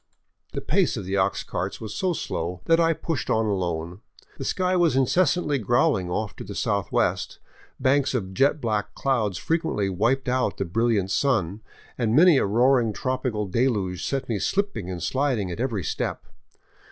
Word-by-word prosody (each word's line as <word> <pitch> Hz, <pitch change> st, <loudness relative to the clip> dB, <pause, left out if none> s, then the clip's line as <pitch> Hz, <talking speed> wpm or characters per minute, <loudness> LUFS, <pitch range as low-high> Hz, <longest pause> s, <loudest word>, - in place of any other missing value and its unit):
The -, -, -3 dB
pace -, -, +1 dB
of 95 Hz, -, -5 dB
the 95 Hz, +1 st, -1 dB
ox 95 Hz, -, +1 dB
carts 95 Hz, +3 st, -4 dB
was 110 Hz, -2 st, -6 dB
so 190 Hz, -2 st, 0 dB
slow 90 Hz, -, -4 dB
that 165 Hz, 0 st, +4 dB
I 165 Hz, 0 st, +4 dB
pushed 165 Hz, -2 st, -3 dB
on 110 Hz, 0 st, +2 dB
alone. 90 Hz, -2 st, -2 dB, 0.4 s
The -, -, -3 dB
sky 185 Hz, 0 st, 0 dB
was 170 Hz, -7 st, +3 dB
incessantly 145 Hz, +2 st, +2 dB
growling 105 Hz, -5 st, +2 dB
off 105 Hz, +3 st, -3 dB
to -, -, -6 dB
the 100 Hz, 0 st, -8 dB
southwest, 100 Hz, -5 st, 0 dB, 0.4 s
banks 135 Hz, 0 st, +2 dB
of 95 Hz, -6 st, -3 dB
jet 140 Hz, +8 st, +2 dB
black 105 Hz, -4 st, -2 dB
clouds 110 Hz, -9 st, 0 dB
frequently 160 Hz, -, -1 dB
wiped 120 Hz, +9 st, 0 dB
out 125 Hz, -5 st, 0 dB
the 95 Hz, -, -1 dB
brilliant 105 Hz, 0 st, +1 dB
sun, 105 Hz, -8 st, 0 dB, 0.4 s
and 115 Hz, -1 st, +1 dB
many 165 Hz, 0 st, +7 dB
a -, -, +1 dB
roaring 120 Hz, +1 st, +3 dB
tropical 125 Hz, -3 st, -2 dB
deluge 100 Hz, -4 st, 0 dB
set 135 Hz, -1 st, -2 dB
me 110 Hz, -4 st, -1 dB
slipping 200 Hz, -, -1 dB
and 90 Hz, -3 st, -5 dB
sliding 130 Hz, -8 st, 0 dB
at 85 Hz, -, -6 dB
every 115 Hz, -7 st, -1 dB
step. -, -, -3 dB
115 Hz, 170 wpm, -25 LUFS, 95-135 Hz, 0.4 s, many